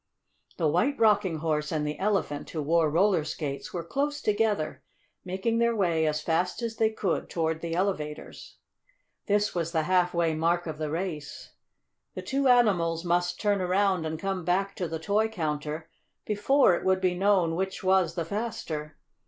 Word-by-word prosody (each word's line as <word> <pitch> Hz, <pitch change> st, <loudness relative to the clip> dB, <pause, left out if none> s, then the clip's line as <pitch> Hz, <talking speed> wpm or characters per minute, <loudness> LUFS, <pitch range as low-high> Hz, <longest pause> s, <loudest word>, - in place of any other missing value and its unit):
The 165 Hz, -, +1 dB
White 215 Hz, -, +1 dB
Rocking 205 Hz, -5 st, +3 dB
Horse 150 Hz, -1 st, -1 dB
and 155 Hz, -2 st, -1 dB
the 150 Hz, 0 st, -4 dB
Elephant, 190 Hz, -8 st, -1 dB
who 155 Hz, -3 st, -3 dB
wore 160 Hz, +1 st, +3 dB
roller 175 Hz, +1 st, +3 dB
skates, 150 Hz, -2 st, -5 dB
were 170 Hz, -, -4 dB
close 285 Hz, -, -2 dB
together, 210 Hz, -, 0 dB, 0.4 s
making 190 Hz, +5 st, -1 dB
their 235 Hz, 0 st, +2 dB
way 170 Hz, -6 st, +1 dB
as 150 Hz, 0 st, -1 dB
fast 180 Hz, +7 st, 0 dB
as 225 Hz, -1 st, -3 dB
they 220 Hz, -1 st, +3 dB
could 205 Hz, -5 st, -2 dB
toward 160 Hz, -1 st, -1 dB
the 165 Hz, -1 st, -3 dB
elevators. 170 Hz, -5 st, -3 dB, 0.7 s
This 205 Hz, 0 st, +2 dB
was 170 Hz, -1 st, -2 dB
the 160 Hz, -2 st, +1 dB
half 180 Hz, +1 st, +2 dB
way 170 Hz, -2 st, +2 dB
mark 170 Hz, +2 st, +1 dB
of 155 Hz, -2 st, -6 dB
the 155 Hz, -1 st, -2 dB
race. 160 Hz, -3 st, -5 dB, 0.6 s
The -, -, -5 dB
two 275 Hz, 0 st, 0 dB
animals 180 Hz, -9 st, +3 dB
must 175 Hz, 0 st, 0 dB
turn 205 Hz, -2 st, +1 dB
around 185 Hz, -2 st, +1 dB
and 160 Hz, 0 st, -3 dB
come 190 Hz, +1 st, -3 dB
back 195 Hz, +3 st, 0 dB
to 180 Hz, -, -2 dB
the 165 Hz, +1 st, -4 dB
toy 205 Hz, +7 st, +1 dB
counter 155 Hz, -5 st, -3 dB, 0.4 s
before 215 Hz, +2 st, +3 dB
it 175 Hz, -, -2 dB
would 190 Hz, 0 st, +2 dB
be 185 Hz, -1 st, +1 dB
known 185 Hz, -3 st, +2 dB
which 190 Hz, +2 st, -3 dB
was 185 Hz, -3 st, +2 dB
the 170 Hz, -3 st, -2 dB
faster. 165 Hz, -7 st, -4 dB
175 Hz, 175 wpm, -27 LUFS, 160-205 Hz, 0.7 s, Rocking